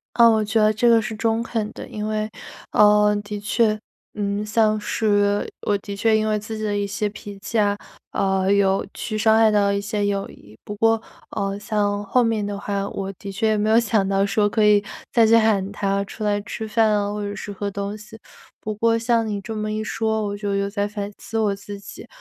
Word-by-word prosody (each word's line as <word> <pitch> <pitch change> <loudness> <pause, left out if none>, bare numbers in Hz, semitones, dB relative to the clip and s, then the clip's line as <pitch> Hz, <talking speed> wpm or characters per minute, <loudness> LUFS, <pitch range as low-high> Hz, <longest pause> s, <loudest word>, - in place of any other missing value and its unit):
呃， 235 -1 +7
我 220 -1 +3
觉 220 +1 +1
得 215 0 +4
这 235 +3 +2
个 230 -1 +6
是 220 0 -4
中 225 +1 0
肯 220 -2 -3
的。 - - -8
因 210 0 -5
为， 215 0 -1 0.4
呃， 210 0 +5
的 210 0 -6
确， 215 +1 +1 0.4
嗯， 205 0 -2
像 215 0 +2
是 205 -1 +1 0.2
我 205 - +2
的 200 0 -7
确 220 +2 +2
因 215 0 +1
为 215 0 +1
自 220 +1 -6
己 215 - -4
的 205 -1 -1
一 205 0 0
些 210 +1 -2
脾 205 -1 -10
气 225 +2 -3
啊， 205 -1 +2 0.4
呃， 190 0 +1
有 195 -1 +2
去 215 - -4
伤 220 +1 +4
害 225 -1 +5
到 205 -1 +3
一 200 - 0
些 205 0 -2
友 200 -1 -1
谊。 105 +2 -16
不 210 - -6
过， 225 +1 +3 0.3
呃， 195 0 -2
像 205 -1 -1
后 240 +4 +2
面 220 -2 0
的 200 -1 -4
话， 200 0 -2
我 195 -1 -4
的 200 - -7
确 205 +3 0
也 215 - +2
没 210 +1 0
有 225 - +6
想 215 -4 +2
到 195 0 +2
说 205 +1 +2
可 215 +1 +1
以， 210 -1 +5 0.3
再 230 -2 +5
去 230 +1 +6
喊 205 -3 +2
他 200 -1 0
出 215 +2 -7
来 205 0 +1
吃 220 +2 -6
饭 220 0 +2
啊， 205 -1 0
或 210 0 -4
者 205 0 -4
是 205 - -6
喝 200 +1 -4
东 200 +1 -4
西。 215 +1 -13 0.4
不 215 0 -4
过 230 +2 +2
像 230 0 +1
你 205 -1 -2
这 220 +3 -6
么 215 0 -3
一 215 0 -2
说， 220 -1 -1
我 205 0 -3
就 205 -1 -2
有 200 0 0
在 200 0 -2
反 205 -1 -5
思 225 - -4
我 210 -2 +1
自 200 0 -9
己， 200 - -11
210 Hz, 250 characters per minute, -22 LUFS, 200-220 Hz, 0.4 s, 呃